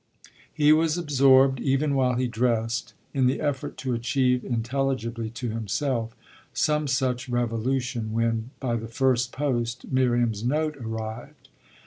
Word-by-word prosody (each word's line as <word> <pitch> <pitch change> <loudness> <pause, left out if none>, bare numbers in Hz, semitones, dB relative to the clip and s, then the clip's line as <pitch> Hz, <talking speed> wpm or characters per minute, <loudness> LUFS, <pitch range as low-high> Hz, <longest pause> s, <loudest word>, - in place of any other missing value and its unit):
He 150 0 +5
was 160 +1 +2
absorbed, 135 -4 +4
even 140 +2 +1
while 130 -2 +2
he 125 +1 0
dressed, 115 -1 -1 0.2
in 130 -2 +3
the 130 - 0
effort 145 -4 -2
to 130 -1 -2
achieve 125 +1 +1
intelligibly 120 -1 -2
to 120 +1 -5
himself 115 +2 -2 0.4
some 150 -1 +1
such 130 -2 -1
revolution 120 0 -1
when, 115 +1 0
by 120 -3 -1
the 115 0 -6
first 125 +1 +1
post, 120 -4 -2
Miriam's 120 -4 +1
note 150 +4 0
arrived. 110 -1 -7
125 Hz, 130 wpm, -25 LUFS, 115-135 Hz, 0.4 s, He